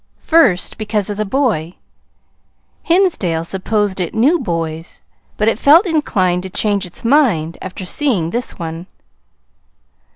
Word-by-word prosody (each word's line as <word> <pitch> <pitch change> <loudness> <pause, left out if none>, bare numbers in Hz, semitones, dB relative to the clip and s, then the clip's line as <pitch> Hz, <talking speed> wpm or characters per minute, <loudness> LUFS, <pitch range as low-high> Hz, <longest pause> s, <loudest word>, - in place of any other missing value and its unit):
First, 245 - +2
because 210 -1 -1
of 205 - -5
the 215 - -1
boy 200 - -1 1.1
Hinsdale 330 - +1
supposed 195 +2 -2
it 180 - -3
knew 285 +10 +3
boys, 165 - -5 0.3
but 210 - 0
it 225 0 +1
felt 315 +9 +6
inclined 190 - 0
to 190 - -7
change 205 0 0
its 175 - -6
mind 220 - +2
after 185 0 -7
seeing 195 - 0
this 240 +1 -4
one. 165 +1 -6
205 Hz, 130 wpm, -17 LUFS, 175-255 Hz, 1.1 s, felt